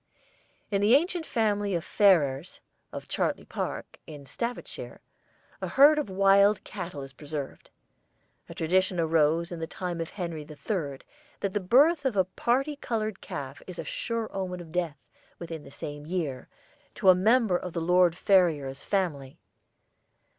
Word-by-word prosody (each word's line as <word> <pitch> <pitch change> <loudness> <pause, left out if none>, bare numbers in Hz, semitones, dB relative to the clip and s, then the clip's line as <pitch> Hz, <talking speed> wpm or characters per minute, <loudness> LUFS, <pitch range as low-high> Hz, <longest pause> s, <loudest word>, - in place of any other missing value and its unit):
"In 200 -1 +1
the 215 +5 +6
ancient 340 +2 +1
family 205 -3 0
of 170 - -2
Ferrers, 165 -6 +2 0.3
of - - -7
Chartley - - -1
Park, - - -5
in 145 -3 -10
Staffordshire, 235 - -5 0.6
a - - -2
herd 295 +3 +6
of 290 - -3
wild 195 +2 +4
cattle 175 -7 -6
is 135 -1 -11
preserved. 145 -2 -7 0.8
A - - -9
tradition 185 +2 +1
arose 165 +1 +2
in 170 - -5
the 160 - -4
time 175 -1 -4
of 165 - -4
Henry 170 -5 -5
III. 150 -1 -4 0.4
that 200 -2 -1
the 205 - +1
birth 285 - +4
of 255 -7 0
a 190 - +4
parti 265 - 0
coloured 220 -6 -3
calf 135 -1 -7
is 180 -2 -8
a - - -4
sure 230 -2 -3
omen 185 -2 -3
of 165 -2 -10
death, 170 -4 -2 0.4
within 165 -2 -7
the - - -12
same 145 +1 -8
year, 160 -7 -3 0.5
to 190 - +3
a - - +10
member 215 +2 +3
of 175 -1 -3
the 170 - -2
Lord 180 0 +3
Ferrers 155 -10 +2
family. 150 -9 -2
180 Hz, 155 wpm, -28 LUFS, 160-205 Hz, 0.8 s, a